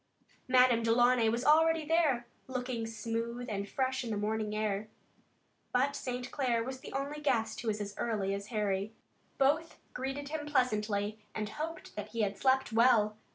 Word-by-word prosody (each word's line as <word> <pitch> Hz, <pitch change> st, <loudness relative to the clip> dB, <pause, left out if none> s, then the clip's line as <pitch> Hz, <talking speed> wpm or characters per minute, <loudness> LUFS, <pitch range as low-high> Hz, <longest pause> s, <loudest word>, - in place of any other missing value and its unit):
Madame 250 Hz, -2 st, +5 dB
Delaunay 235 Hz, 0 st, +4 dB
was 235 Hz, +3 st, -1 dB
already 320 Hz, +1 st, +5 dB
there, 300 Hz, -7 st, +2 dB, 0.2 s
still 260 Hz, -, -12 dB
looking 245 Hz, -2 st, -2 dB
smooth 230 Hz, +2 st, -3 dB
and 200 Hz, -3 st, -3 dB
fresh 260 Hz, -1 st, -1 dB
in 235 Hz, -, -5 dB
the 215 Hz, -, -1 dB
morning 215 Hz, 0 st, -1 dB
air. 215 Hz, -1 st, -1 dB, 0.9 s
But 270 Hz, +3 st, +2 dB
St. 250 Hz, -1 st, -4 dB
Clair 245 Hz, -5 st, +1 dB
was 260 Hz, +2 st, -5 dB
the -, -, -9 dB
only 280 Hz, +2 st, -3 dB
guest 225 Hz, -6 st, 0 dB
who 235 Hz, -, -6 dB
was 215 Hz, -1 st, 0 dB
as 205 Hz, -1 st, -4 dB
early 205 Hz, -4 st, 0 dB
as 200 Hz, +1 st, -4 dB
Harry. 210 Hz, -1 st, -1 dB, 0.4 s
Both 300 Hz, +5 st, +2 dB, 0.2 s
greeted 270 Hz, +2 st, -4 dB
him 300 Hz, -1 st, -4 dB
pleasantly 215 Hz, -6 st, 0 dB, 0.2 s
and 215 Hz, -1 st, -2 dB
hoped 320 Hz, +2 st, -6 dB
that 210 Hz, -1 st, -4 dB
he 230 Hz, -, 0 dB
had 200 Hz, -1 st, 0 dB
slept 265 Hz, 0 st, +2 dB
well. 225 Hz, -2 st, +4 dB
235 Hz, 170 wpm, -32 LUFS, 215-265 Hz, 0.9 s, Madame